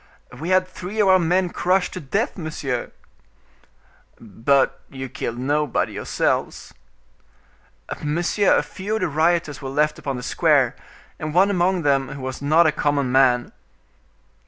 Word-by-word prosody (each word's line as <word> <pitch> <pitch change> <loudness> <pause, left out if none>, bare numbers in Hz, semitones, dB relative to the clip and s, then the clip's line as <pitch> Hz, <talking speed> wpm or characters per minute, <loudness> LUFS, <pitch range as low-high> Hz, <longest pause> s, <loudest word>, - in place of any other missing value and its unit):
"We 165 +4 -6
had 185 0 +3
three 185 +3 -7
of 205 - +4
our 185 0 +6
men 175 +1 +1
crushed 185 +1 0
to - - -5
death, 195 - -2
monsieur!" 150 - -4 1.3
"But 115 +6 +1
you 135 -1 -6
killed 115 0 -5
nobody 145 +2 0
yourselves?" - - -2 1.3
"Monsieur, 175 +6 +1
a - - +1
few 205 +3 -4
of 220 - -2
the 185 - +1
rioters 160 -1 0
were 135 - -5
left 150 +2 0
upon 135 -2 -4
the 125 - -7
square, - - +2 0.4
and 155 0 -5
one 195 +3 +5
among 180 -1 +1
them 135 -2 +1
who 140 - -8
was 130 0 -5
not 155 +4 +4
a 160 - +4
common 145 -3 0
man." 125 -2 +3
150 Hz, 150 wpm, -22 LUFS, 135-180 Hz, 1.3 s, our